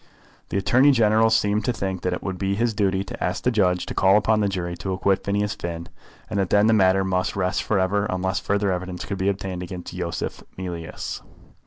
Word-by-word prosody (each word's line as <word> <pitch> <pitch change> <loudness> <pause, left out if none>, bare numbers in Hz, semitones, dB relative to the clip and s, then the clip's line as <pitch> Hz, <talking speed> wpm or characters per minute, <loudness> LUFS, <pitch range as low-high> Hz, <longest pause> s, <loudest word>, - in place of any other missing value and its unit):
The - - -1
Attorney 125 +8 +4
General 110 -3 +4
seemed 105 -1 +2
to - - +2
think 95 -5 -3
that 90 - -1
it 90 - -4
would 95 -1 -4
be 95 0 0
his 115 +2 0
duty 95 -2 +1
to 95 - -7
ask 90 - -2
the 125 - +2
judge 90 -5 +2
to - - -5
call 95 +1 +5
upon 110 +1 +2
the 105 - +2
jury 90 -3 -3
to 95 +3 -4
acquit 95 0 +1
Phineas 105 +1 0
Finn, 85 0 -6 0.4
and 105 -2 -2
that 95 - 0
then 105 +1 +4
the 110 - +4
matter 95 -2 +4
must 95 -1 -1
rest 95 -1 0
for 105 - 0
ever, 100 +2 +1
unless 95 +1 -1
further 100 -1 0
evidence 90 0 -4
could 100 -1 -4
be 95 +1 +2
obtained 95 -2 -3
against 90 0 -7
Yosef - - -4 0.2
Mealyus. 85 -3 -5
95 Hz, 220 wpm, -23 LUFS, 90-105 Hz, 0.4 s, call